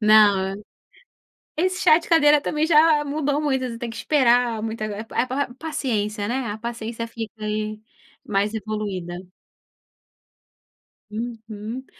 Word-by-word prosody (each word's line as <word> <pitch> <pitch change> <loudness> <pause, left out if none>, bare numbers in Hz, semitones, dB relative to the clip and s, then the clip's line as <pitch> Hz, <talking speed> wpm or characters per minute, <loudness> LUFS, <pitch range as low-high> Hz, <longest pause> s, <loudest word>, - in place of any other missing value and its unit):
não, 205 -2 +5 1.0
esse 370 +3 0
chá 310 - +7
de 340 - -13
cadeira 300 -3 +6
também 300 +1 0
já 310 -2 +5
mudou 290 0 0
muitas, 265 -4 0
você - - -7
tem 235 0 -5
que - - -10
esperar, 245 -5 +3
muita 215 -1 -4
pa 240 - -1
pa 260 -1 -2
paciência, 215 -9 -2
né, 250 +1 -1
a 205 0 -4
paciência 230 0 -5
fica 225 -1 -6
aí 215 0 -2 0.5
mais 205 +2 0
evoluída. 205 -5 -4 2.0
Uhum. 225 +2 -6
230 Hz, 125 wpm, -23 LUFS, 215-285 Hz, 2.0 s, chá